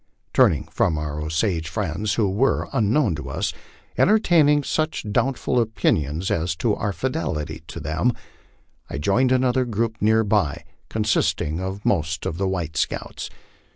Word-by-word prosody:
Turning - - +4
from 80 - 0
our 75 0 -3
Osage 80 +1 -1
friends, 100 +4 -2
who 110 -3 +2
were, 105 +8 +1
unknown 110 - +2
to 75 -4 -6
us, - - -2 0.5
entertaining 165 -9 +4
such 155 -1 -1
doubtful 130 +2 +1
opinions 85 -7 0
as 80 0 0
to 105 +6 +1
our 100 0 -1
fidelity 80 - -3
to - - -7
them, 80 - 0 0.8
I - - -4
joined 120 - +2
another 130 0 +3
group 115 -1 -2
near 110 +2 +4
by, 100 -8 0 0.3
consisting 105 -7 0
of 95 +2 -5
most 80 -3 0
of 80 - -3
the 100 - +1
white 90 -5 -3
scouts. - - -3
100 Hz, 145 wpm, -23 LUFS, 80-120 Hz, 0.8 s, Turning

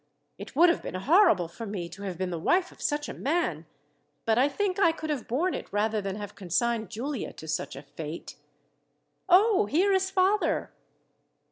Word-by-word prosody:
It - - -9
would 345 +4 +6
have 335 - +1
been - - -6
horrible 240 - +4
for 225 +7 -8
me 190 -4 -4
to 180 +4 -11
have 190 -4 -5
been 185 -1 -2
the 170 - -3
wife 360 - +2
of - - -17
such 295 0 -1
a - - -5
man; 265 - -1 0.6
but 225 - +3
I 275 +3 +4
think 385 +5 -1
I 335 -4 +5
could 315 -1 -5
have 280 -6 -3
borne 330 +10 0
it - - -6
rather 210 +1 0
than 195 -1 -4
have 205 -1 -7
consigned 220 +3 -1
Giulia 255 +4 -4
to 160 - -11
such 155 - -3
a - - -9
fate. 150 +3 -8 0.9
"Oh, 410 +3 +5
here 375 +6 +2
is 380 0 +2
father!" 385 +2 +1
245 Hz, 195 wpm, -28 LUFS, -, 0.9 s, would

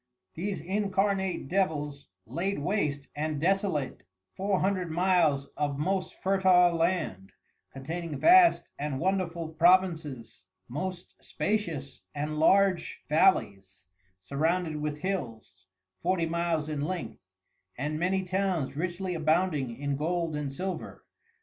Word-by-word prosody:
These 190 0 -3
incarnate 195 -1 0
Devils 150 -6 -1 0.2
laid 175 - -2
waste 145 -4 -1
and 150 0 -2
desolate 185 -4 0 0.3
Four 195 -1 0
Hundred 185 -2 0
miles 165 -5 +2
of 145 -2 -1
most 185 +5 -1
Fertile 185 -2 +5
Land, 165 - -1 0.4
containing 160 +3 -5
vast 350 +1 +6
and 145 -2 -2
wonderful 175 -2 -1
Provinces, 160 - +2 0.2
most 175 +8 -5
spatious 165 -11 -2
and 150 +1 -3
large 195 +2 +3
Valleys 100 - +2 0.4
surrounded 160 - 0
with 150 0 -3
Hills, 115 - -5 0.3
forty 180 - +1
Miles 165 -2 -1
in 150 -2 -3
Length, 150 -7 -4 0.6
and 150 +4 -2
many 190 +2 +1
Towns 185 -6 -1
richly 180 +3 -2
abounding 155 -6 +1
in 145 -1 -2
Gold 165 +1 -1
and 145 -2 -3
Silver. 185 +6 -5
165 Hz, 110 wpm, -29 LUFS, 145-185 Hz, 0.6 s, vast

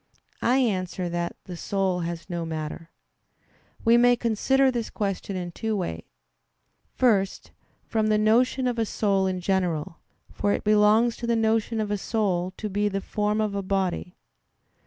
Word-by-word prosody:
I 250 +3 +3
answer 185 -7 0
that, 170 0 -3
The 180 - -8
soul 190 0 -1
has 170 -1 -4
no 175 -2 -3
matter. 160 0 -5 1.0
We 230 +1 +6
may 245 0 +5
consider 260 +4 +2
this 235 -3 -3
question 195 -1 -3
in 175 -1 -4
two 220 +4 -2
ways. 85 - -3 0.9
First, 200 -6 +1 0.3
from 220 -1 0
the 215 0 +3
notion 240 +5 +3
of 245 -2 0
a 225 - +2
soul 195 -3 +1
in 185 -1 -2
general; 175 -4 -1 0.3
for 205 - 0
it - - -2
belongs 215 +2 +4
to 235 - -5
the 235 - +2
notion 225 0 +1
of 210 -1 -2
a 205 - -1
soul 190 -5 -1
to 215 - -4
be 205 +1 0
the 195 0 -2
form 210 +2 -1
of 215 -2 0
a 200 - -1
body. 190 -2 -2
205 Hz, 165 wpm, -25 LUFS, 185-225 Hz, 1.0 s, We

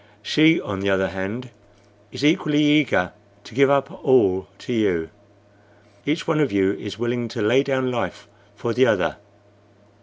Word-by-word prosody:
She, 160 +2 +4
on 95 -2 -5
the 100 +1 -1
other 95 0 +1
hand, 105 +7 -6 0.6
is 145 - -3
equally 150 -1 +2
eager 145 -11 +2 0.3
to - - -14
give 135 +3 +4
up 140 +6 0
all 95 -9 +3
to 125 - -6
you. 90 -8 0 1.0
Each 155 +3 -1
one 160 -2 +1
of 145 -3 +1
you 100 -1 +2
is 105 0 -7
willing 120 +1 -2
to 115 0 -5
lay 120 +6 +4
down 130 -2 -1
life 120 -3 -4 0.3
for 115 +2 -3
the 130 +2 +4
other. 100 -5 +1
120 Hz, 160 wpm, -22 LUFS, 100-140 Hz, 1.0 s, She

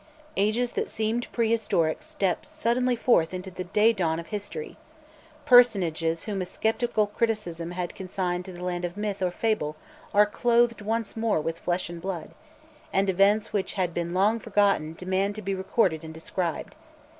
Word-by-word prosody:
Ages 215 +5 +1
that - - -2
seemed 220 +2 -2
prehistoric 220 -9 +1
step 190 -3 -1
suddenly 255 -5 0
forth 185 -8 +2
into 185 +1 -6
the 185 0 -6
daydawn 190 -5 +2
of 170 - -7
history; 210 - -6 0.7
personages 180 - +4
whom 205 -3 -3
a - - -2
sceptical 220 +2 0
criticism 205 -6 -2
had 175 0 -4
consigned 180 -1 -3
to 190 - -8
the 180 0 -9
land 180 -1 -2
of 175 +2 -4
myth 205 -2 -3
or 185 - +2
fable 180 -5 -1 0.4
are 210 +1 +6
clothed 235 +1 +2
once 225 +1 -2
more 225 -5 +1
with 165 +2 -3
flesh 180 +1 -1
and 170 -1 -8
blood, 175 -3 -4 0.6
and 195 0 +2
events 200 +4 +3
which 200 -2 -1
had 180 -3 -1
been 170 0 -2
long 205 +5 +2
forgotten 200 -7 +1
demand 190 +3 -1
to 215 - -5
be 195 +1 -1
recorded 190 -3 +1
and 160 0 -8
described. 165 +1 -3
195 Hz, 165 wpm, -26 LUFS, 175-220 Hz, 0.7 s, are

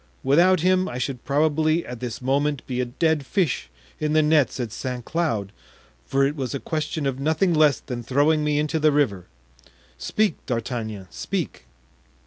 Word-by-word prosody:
Without 170 +6 +4
him 185 +1 +2
I 120 - -5
should 125 -1 -3
probably 155 +3 +2
at 125 -1 -7
this 125 0 -5
moment 140 +2 0
be 125 -1 -2
a - - 0
dead 155 +4 0
fish 160 - -1 0.3
in 150 0 0
the 155 0 +4
nets 150 -4 +2
at 120 -4 -3
Saint 125 +1 -5
Cloud, 115 - -1 0.6
for 135 0 +2
it 145 +2 -1
was 135 -2 -3
a - - -2
question 155 0 -3
of 135 -1 -1
nothing 160 +5 +2
less 150 -5 +4
than 120 -1 -6
throwing 145 +5 +2
me 150 -1 +1
into 150 +1 0
the 155 0 +4
river. 120 -11 0 0.7
Speak, 215 - 0
D'Artagnan, 115 -4 -3
speak." - - -4
145 Hz, 170 wpm, -24 LUFS, 125-155 Hz, 0.7 s, Without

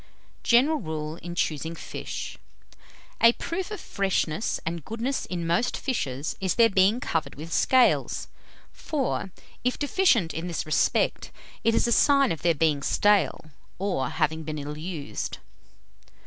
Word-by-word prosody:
_ - - -27 0.4
GENERAL 280 +6 +4
RULE 155 -2 -4
IN 175 0 -7
CHOOSING 160 0 -1
FISH. - - -6 0.8
_A 230 +1 +6
proof 355 +2 -3
of 425 - -5
freshness 190 -2 -1
and 165 -1 -3
goodness 235 - -3
in 175 -2 -3
most 170 +9 +1
fishes, 145 - -2
is 190 -2 0
their 230 -1 +5
being 195 +5 +4
covered 160 - -2
with 160 +3 -7
scales; 260 -2 +3 0.5
for, 270 -9 -2 0.3
if 250 +1 0
deficient 285 - +2
in 165 +2 -4
this 170 - -3
respect, 155 - +1 0.3
it 225 0 +3
is - - +3
a 235 - +1
sign 275 +1 +4
of 160 - -3
their 170 -1 +3
being 150 -1 +2
stale, 205 -4 +2 0.3
or 180 -10 -1
having 160 +1 0
been 155 -1 -5
ill 145 +1 -5
used. 160 -3 -5
175 Hz, 150 wpm, -26 LUFS, 155-235 Hz, 0.8 s, A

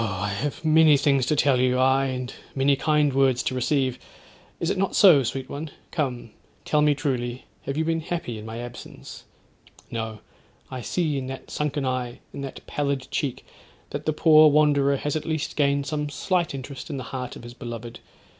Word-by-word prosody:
I 100 -1 -2
have 140 +10 -3
many 155 -1 +6
things 140 -3 +2
to 150 - +2
tell 140 -3 +3
you; 125 0 +2
aye! 130 +1 +3
and 125 -1 -4 0.2
many 140 +1 +3
kind 150 0 +2
words 135 -2 +3
to - - -1
receive; 130 0 0 0.6
is 170 - 0
it - - -1
not 195 -1 0
so, 175 -9 +7
sweet 130 +1 -3
one? 150 +3 -6 0.2
Come, 125 -8 -2 0.3
tell 150 - +2
me 150 -1 +4
truly, 130 -4 -2 0.2
have 140 +1 -2
you 160 - +1
been 165 0 +1
happy 155 -9 -4
in - - -9
my 110 +1 -6
absence? 120 0 -9 0.7
No! 110 -2 -4 0.5
I 130 -1 -5
see 155 -1 -1
in 130 - -5
that 135 0 -8
sunken 150 -1 -1
eye, 125 -2 -2 0.2
in - - -6
that 135 -1 -7
pallid 140 -2 -2
cheek, 135 -4 -2 0.5
that - - -5
the - - +4
poor 155 0 +7
wanderer 145 -2 +3
has 145 +2 -2
at 155 - -1
least 160 -2 -2
gained 140 -1 +2
some 150 +1 -2
slight 175 +1 -1
interest 135 0 -7
in 145 - -3
the 130 - -5
heart 125 -1 -4
of - - -11
his 120 0 -9
beloved. 120 -1 -7
140 Hz, 190 wpm, -25 LUFS, 125-150 Hz, 0.7 s, so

